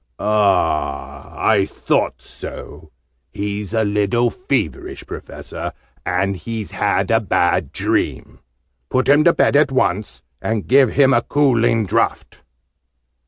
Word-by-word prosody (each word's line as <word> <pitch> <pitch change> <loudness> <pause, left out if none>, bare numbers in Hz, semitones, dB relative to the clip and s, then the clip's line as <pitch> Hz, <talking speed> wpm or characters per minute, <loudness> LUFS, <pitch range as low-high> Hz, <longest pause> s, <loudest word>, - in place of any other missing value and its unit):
Ah, 100 -9 0
I 100 -3 +2
thought - - -1
so! - - -9 0.4
He's 100 0 -4
a 110 -1 +1
little 105 +3 +1
feverish, 135 - -3
Professor, - - -7 0.3
and 95 +2 -1
has 110 0 -6
had - - 0
a 115 - +4
bad 90 -5 +1
dream. - - -2 0.5
Put 130 0 0
him 145 +2 +5
to 170 - +6
bed - - +2
at 145 -1 +4
once, 105 -6 -1 0.2
and 110 -2 -2
give 135 -1 +5
him 135 -1 +4
a 120 - +4
cooling 120 -5 +2
draught." 95 - -1
110 Hz, 120 wpm, -19 LUFS, 100-130 Hz, 0.5 s, to